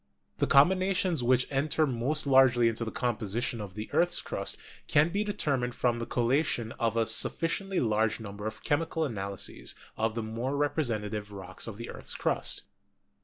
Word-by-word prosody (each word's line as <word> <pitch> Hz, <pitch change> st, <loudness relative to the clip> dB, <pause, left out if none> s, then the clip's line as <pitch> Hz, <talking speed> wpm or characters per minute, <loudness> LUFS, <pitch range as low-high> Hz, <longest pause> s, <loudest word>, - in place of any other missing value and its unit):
The -, -, +2 dB
combinations 185 Hz, +2 st, +4 dB
which 125 Hz, +1 st, +3 dB
enter 150 Hz, +3 st, +2 dB
most 135 Hz, +4 st, 0 dB
largely 130 Hz, -3 st, +5 dB
into 115 Hz, 0 st, 0 dB
the 115 Hz, -, -3 dB
composition 120 Hz, 0 st, -2 dB
of 100 Hz, -3 st, -8 dB
the 110 Hz, +1 st, -5 dB
earth's 175 Hz, 0 st, +3 dB
crust -, -, -2 dB, 0.3 s
can 150 Hz, +3 st, +4 dB
best -, -, -10 dB
be 205 Hz, +1 st, +1 dB
determined 140 Hz, -12 st, -1 dB
from 120 Hz, -1 st, +1 dB
the 115 Hz, -, -4 dB
collation 120 Hz, -1 st, 0 dB
of 115 Hz, -1 st, 0 dB
a 115 Hz, -, +3 dB
sufficiently 170 Hz, -, 0 dB
large 110 Hz, -1 st, +1 dB
number 105 Hz, -1 st, -6 dB
of 110 Hz, 0 st, -7 dB
chemi 160 Hz, +2 st, +1 dB
cal 160 Hz, -, 0 dB
analyses 100 Hz, -, -4 dB, 0.2 s
of 110 Hz, 0 st, 0 dB
the 115 Hz, -, -2 dB
more 115 Hz, +6 st, -3 dB
representative 110 Hz, -8 st, -1 dB
rocks 95 Hz, 0 st, -5 dB
of 110 Hz, -3 st, -6 dB
the 115 Hz, -, -6 dB
earth's -, -, -2 dB
crust. -, -, -1 dB
120 Hz, 170 wpm, -29 LUFS, 110-145 Hz, 0.3 s, largely